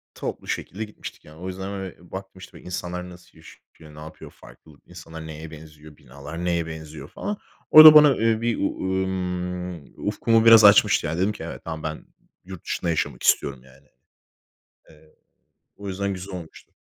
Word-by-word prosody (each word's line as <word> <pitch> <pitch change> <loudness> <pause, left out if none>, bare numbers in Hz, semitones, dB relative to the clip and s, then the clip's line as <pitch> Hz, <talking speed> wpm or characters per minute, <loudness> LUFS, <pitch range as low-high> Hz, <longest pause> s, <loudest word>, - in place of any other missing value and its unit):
Toplu - - -6
şekilde 105 +4 -4
gitmiştik 105 -1 -11
yani. 75 +1 -15
O 90 - -6
yüzden, 95 +1 -6
böyle, 95 -3 -9
baktım, 95 0 -9
işte, - - -13
böyle, - - -15
insanlar 90 0 -5
nasıl 90 -2 -16
yaşıyor, 80 -1 -17
ne - - -12
yapıyor, 80 +1 -11
farklı 60 +6 -18
insanlar 80 -2 -11
neye 80 0 -9
benziyor, 75 -1 -14
binalar 70 +7 -9
neye 85 -2 -1
benziyor 80 -1 -9
falan. 205 0 -5 0.3
Orada, 155 0 +11
bana, 150 -3 +7
eee, 115 0 0
bir, 115 -1 -1
ııı, 95 -1 -2
ımm, 90 -3 -5
ufkumu 115 -1 +2
biraz 115 -1 +8
açmıştı, 100 -4 +5
ya 80 +2 -3
dedim 95 +4 +1
ki 105 - -9
"Evet. 85 - -8
tamam, 80 -1 -6
ben 80 0 -6 0.4
yurt 95 -2 -10
dışında 85 - -3
yaşamak 80 - -2
istiyorum." 65 -3 +1
yani. 65 +2 -21 1.0
Eee, 75 0 -22 0.6
o 100 0 -9
yüzden 100 +1 -3
güzel 95 +1 -8
olmuştu. 85 -3 -11
90 Hz, 170 wpm, -23 LUFS, 80-95 Hz, 1.0 s, Orada